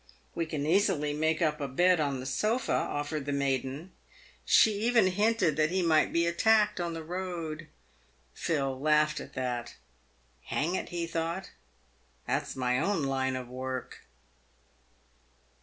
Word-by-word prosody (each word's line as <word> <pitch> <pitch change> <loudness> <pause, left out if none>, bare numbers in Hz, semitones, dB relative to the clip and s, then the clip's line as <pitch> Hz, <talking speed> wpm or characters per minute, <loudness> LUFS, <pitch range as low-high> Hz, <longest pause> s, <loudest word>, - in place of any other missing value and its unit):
" - - -35
"We 165 -1 -2
can 150 -2 -3
easily 155 -4 +2
make 160 +2 +1
up 150 -1 0
a 140 - -1
bed 175 +6 +3
on 140 -3 0
the 130 - -6
sofa," 215 - 0
offered 145 0 -2
the - - 0
maiden. 140 +4 -2 0.5
She 220 - +5
even 230 -1 +4
hinted 190 -4 +2
that 155 0 +3
he 185 +1 0
might 160 -2 +3
be 170 0 +2
attacked 210 +4 +3
on 170 -1 -2
the 165 - -6
road. 170 -2 -5 0.7
Phil 135 -5 -1
laughed 150 +1 +2
at 140 - -10
that. 125 -2 -3 0.4
" - - -38 0.3
Hang 160 +5 -1
it," - - -3
he 170 -1 -3
thought, 165 +3 -3 0.4
" - - -37
that's - - -2
my 125 -1 0
own 195 -3 0
line 130 -1 0
of 130 -1 -5
work." 130 +1 -6
155 Hz, 155 wpm, -29 LUFS, 140-180 Hz, 0.7 s, She